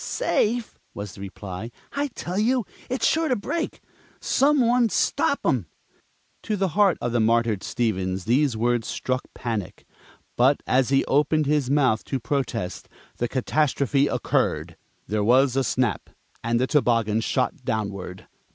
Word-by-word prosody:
"Safe!" 240 - -1 0.2
was 100 -1 -6
the 95 - -11
reply. 100 +2 -7 0.2
"I 285 +1 -1
tell 180 +3 -3
you, 240 +1 +2 0.2
it's 255 +1 0
sure 320 0 +2
to 255 - +2
break! 325 +10 -3 0.4
Some 285 +2 +3
one 240 -1 +3
stop - - +1
'em - - +1 0.4
" - - -42
To 215 -2 -2
the 195 -1 +1
heart 195 +3 +3
of 120 - -2
the 120 - +1
martyred 115 -2 +2
Stevens 95 -6 -2
these 125 +1 +2
words 120 0 +1
struck 130 0 -2
panic. 110 -6 -4 0.5
But 130 +4 +3
as 130 0 +2
he 135 0 +3
opened 150 +2 +2
his 145 -3 +1
mouth 135 -6 +2
to 135 - -2
protest, 115 -7 -3 0.3
the 120 - -1
catastrophe 140 +1 +1
occurred. 80 - -1 0.3
There 105 0 -1
was 130 +3 +4
a 135 - +2
snap, 125 -5 -1 0.3
and 115 +1 +1
the 130 - +2
toboggan 115 -6 +2
shot - - 0
downward. 100 -4 -4
130 Hz, 150 wpm, -24 LUFS, 110-155 Hz, 0.5 s, was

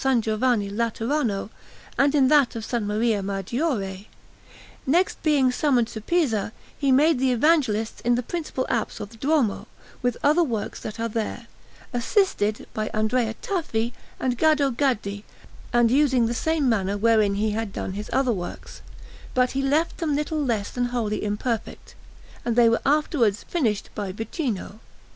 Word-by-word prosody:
Giovanni 220 -1 +1
Laterano, 230 0 -1 0.4
and 280 +2 +3
in 270 -3 +5
that 290 -6 +4
of 225 - -4
S. 240 - +1
Maria 210 +1 0
Maggiore. 195 - -2 0.8
Next, 345 +7 +2
being 280 -5 +3
summoned 250 -4 +2
to 220 - -7
Pisa, 225 - 0 0.2
he 275 -2 +1
made 290 +2 +4
the 260 0 +2
Evangelists 245 -5 +2
in 240 0 +2
the 245 - -1
principal 305 -3 -3
apse 230 - -2
of 205 0 -7
the 225 - -14
Duomo, 270 -4 +1 0.3
with 245 -1 0
other 300 +5 +4
works 230 -9 -3
that 220 +1 -7
are 230 - 0
there, 225 +1 -4 0.5
assisted 235 - +1
by 215 0 -2
Andrea 220 +1 +1
Tafi 240 - -1 0.3
and 250 -1 0
by - - -13
Gaddo 280 -2 +1
Gaddi, 220 -6 -1 0.5
and 240 -1 +4
using 265 -3 +3
the 230 - -1
same 315 +3 0
manner 200 -4 +1
wherein 215 -2 +3
he 215 +1 0
had 220 -1 -3
done 190 - -4
his 210 +2 -6
other 260 -2 +2
works; 175 -3 -7 0.5
but 250 0 +3
he 270 - -1
left 295 +5 +1
them 310 -4 0
little 300 +1 -1
less 225 -6 -1
than 245 0 -1
wholly 235 -4 -2
imperfect, 210 +2 -3 0.5
and 235 -1 -1
they 240 -1 +6
were 230 - +1
afterwards 275 - +2
finished 230 - -1
by 205 -3 -4
Vicino. 225 - -4
235 Hz, 160 wpm, -24 LUFS, 215-275 Hz, 0.8 s, they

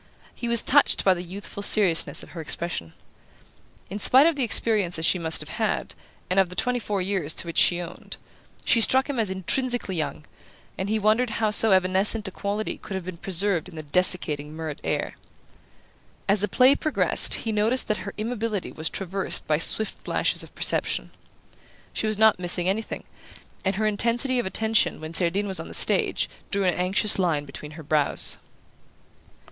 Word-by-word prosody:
He 240 - -6
was 235 -1 +5
touched 285 +2 +2
by 190 - +5
the 175 - -6
youthful 195 +3 -8
seriousness 200 -5 +3
of - - -14
her 170 - -8
expression. 155 - -3 1.0
In 205 - -5
spite 265 +6 +5
of 335 -1 +2
the 280 - -3
experiences 200 -7 +1
she 180 - +2
must 160 -1 +1
have - - -9
had, - - -2 0.3
and 185 +2 +1
of 190 -2 +2
the 180 - -9
twenty 250 +5 -1
four 205 -4 -3
years 185 -6 -3
to - - -3
which 170 - -2
she 175 - +3
owned, 175 -1 -9 0.5
she 230 - +3
struck 265 +4 +5
him 280 -4 -4
as 215 -4 +1
intrinsically 200 +3 -1
young; 155 -1 -4 0.5
and 190 +1 -5
he 220 - 0
wondered 220 +4 +1
how 220 -1 -1
so 215 +1 +5
evanescent 190 +3 +4
a - - -6
quality 205 +3 -4
could 195 - -8
have 190 -2 -6
been 185 -2 -8
preserved 185 -1 -1
in 175 - -14
the 155 - -8
desiccating 150 -2 +4
Murrett 160 -2 -7
air. - - -3 1.1
As 200 +1 +2
the 210 - 0
play 255 +7 +4
progressed 310 +1 +2
he 225 - -4
noticed 220 +4 0
that 215 - -1
her 200 - -8
immobility 220 -2 -4
was 160 0 -4
traversed 195 0 -1
by 150 -1 0
swift 215 +5 +1
flashes - - -2
of - - -13
perception. - - -1 0.8
She 220 - -3
was 215 -1 -2
not 220 -3 +3
missing 175 0 -1
anything, 210 +4 -3 0.6
and 190 0 -1
her 215 +2 -2
intensity 235 +5 0
of 240 - -3
attention 220 +3 0
when 155 +1 -9
Cerdine 185 +4 0
was 190 -2 -1
on - - -7
the - - -5
stage - - +3 0.2
drew 200 0 0
an 180 -2 +1
anxious 190 +3 -1
line 160 -6 -1
between 150 +2 -10
her 160 0 -11
brows. 150 -1 +2
195 Hz, 185 wpm, -24 LUFS, 175-220 Hz, 1.1 s, was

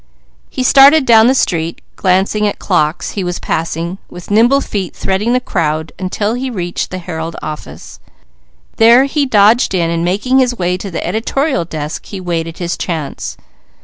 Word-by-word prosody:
He 255 - -3
started 275 +3 +6
down 225 -2 +6
the 260 - +3
street 165 -8 -1 0.2
glancing 195 +3 +1
at 205 - -3
clocks 155 -4 0
he 200 - -3
was 180 -1 -3
passing, 165 +3 -3
with 175 +2 -10
nimble 235 +6 +4
feet 195 -9 -4
threading 200 +5 -1
the 250 - +3
crowds 160 -9 -2
until 205 +3 -2
he 255 +2 -3
reached 175 -7 -4
the 185 - -5
Herald 165 -2 -6
office; 150 - -8 0.8
there 235 +3 +6
he 280 0 0
dodged 215 -1 +4
in 170 -2 0
and 170 0 -1
making 210 +9 +1
his 250 -2 +1
way 180 0 0
to 195 +2 -6
the 170 - -4
editorial 235 - -1
desk 155 -1 -6
he 195 - -7
waited 165 -2 -3
his 175 -1 -3
chance. 160 -5 -4
190 Hz, 170 wpm, -15 LUFS, 170-235 Hz, 0.8 s, started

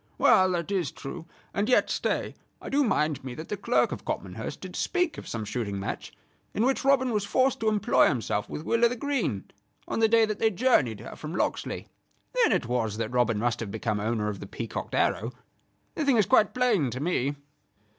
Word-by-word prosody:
"Well, 185 0 +5
that 170 +2 -2
is 180 -9 0
true; 160 +4 -8 0.3
and 205 +4 0
yet, 250 - +3
stay - - -1 0.3
I - - -8
do 285 +1 +3
mind 155 - 0
me 130 -2 -6
that 155 - -8
the - - -1
Clerk 235 +5 +1
of - - -5
Copmanhurst - - -5
did - - -8
speak 360 -3 0
of - - -10
some 110 -2 -4
shooting 105 -2 -3
match 100 - -5 0.4
in 220 - +2
which 265 +1 +1
Robin 265 -2 +3
was 210 -3 0
forced 255 +6 +2
to 220 - +2
employ 210 -2 +4
himself 110 -5 -1
with 150 - -5
Will 230 +7 +1
o' 235 - +7
th' 245 - -4
Green, 260 - -1 0.4
on - - -2
the 225 - +5
day 225 0 +5
that 215 -1 -4
they 220 - +4
journeyed 175 - +2
here - - -8
from 155 +3 -7
Locksley. - - -2 0.5
Then - - +3
it - - +1
was 115 -3 -1
that 110 0 -2
Robin 120 -3 +2
must 120 +2 0
have 115 - -4
become 105 0 -2
owner 110 0 -1
of 105 -2 -3
the - - -8
peacocked - - -5
arrow. 115 +4 +1 0.6
The 315 - -2
thing 275 -4 +3
is 210 - +4
quite 215 -2 +4
plain 225 - +2
to 125 +2 -5
me." 145 -3 0
175 Hz, 215 wpm, -27 LUFS, -, 0.6 s, o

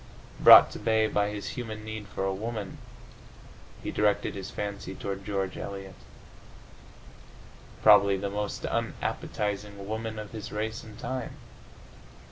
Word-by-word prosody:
Brought - - +10
to - - -7
bay 110 -1 +2
by 105 -1 +1
his 105 -1 -5
human 110 -3 -6
need 110 -1 -6
for 100 -1 -3
a 95 - 0
woman, 105 0 -5 1.0
he - - -3
directed 105 -1 +1
his 95 -1 -6
fancy 100 -2 -5
toward 100 0 -5
George 95 -2 -2
Eliot, 95 -1 -6 1.9
probably 100 -2 +7
the 100 +1 -3
most 105 0 -3
unappetizing 100 -1 -3
woman 110 +1 -4
of 105 -1 -7
his 110 -2 -7
race 110 +1 -3
and 110 -1 -12
time. 130 -2 -4
105 Hz, 130 wpm, -28 LUFS, 100-110 Hz, 1.9 s, Brought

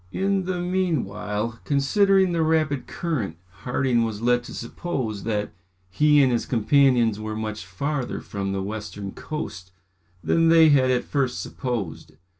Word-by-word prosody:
In 195 - 0
the 185 -1 -2
meanwhile, 115 - -2
considering 190 +7 +3
the 170 -1 0
rapid 155 -3 +1
current 125 - -3 0.2
Harding 125 -1 +1
was 110 -2 -3
led 120 +1 +2
to - - -9
suppose 115 -5 -4
that 105 -2 -2 0.4
he 150 +8 +5
and 130 - +3
his 120 - -1
companions 120 -2 +3
were 110 0 -4
much 110 -1 -4
farther 135 +7 -3
from 100 -1 -4
the 95 -1 -2
western 100 -1 -6
coast 95 - -6 0.5
than 165 0 +3
they 165 -1 +7
had 135 -3 +4
at 125 -1 +2
first 135 -4 -1
supposed. 120 - -4
125 Hz, 145 wpm, -24 LUFS, 110-155 Hz, 0.5 s, they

